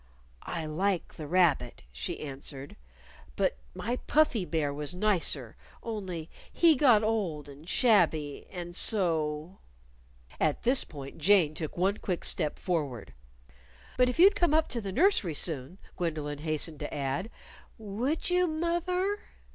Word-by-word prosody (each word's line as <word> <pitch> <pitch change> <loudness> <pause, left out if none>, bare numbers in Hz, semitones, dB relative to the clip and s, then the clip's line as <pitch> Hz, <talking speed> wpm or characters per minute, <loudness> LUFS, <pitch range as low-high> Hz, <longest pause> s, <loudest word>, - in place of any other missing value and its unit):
"I 165 -2 -3
like 180 +4 -1
the 155 - -8
rabbit," 155 - +2
she - - -5
answered, 140 -1 -6 0.6
"but 65 - 0 0.2
my 240 +3 -2
Puffy 270 -11 +2
Bear 155 -4 -1
was 150 +4 -4
nicer, 175 - 0 0.3
only 190 -8 -5 0.2
he 335 -2 +5
got 245 -6 +5
old 195 -10 -1
and 145 +4 -12
shabby, 165 - +2
and 175 -2 -6
so 165 -4 +1 0.4
" - - -30 0.3
At 155 -2 0
this 255 +3 +5
point 140 0 -10
Jane 170 -2 +4
took 155 +1 -5
one 195 +4 +1
quick 180 -3 -3
step 150 - +2
forward. 140 - -3 0.8
"But 250 0 +4
if 250 - -3
you'd 390 +4 +7
come 345 -5 +2
up 315 0 +2
to 235 - -3
the 195 -2 -5
nursery 265 - +2
soon," 155 +1 -2 0.2
Gwendolyn 155 -4 -3
hastened 155 0 -2
to - - -5
add. 140 +8 -2 0.5
"Would 235 - -2
you, 360 0 +3
moth 340 +2 -1
er?" 380 +3 0
175 Hz, 145 wpm, -29 LUFS, 150-230 Hz, 0.8 s, you'd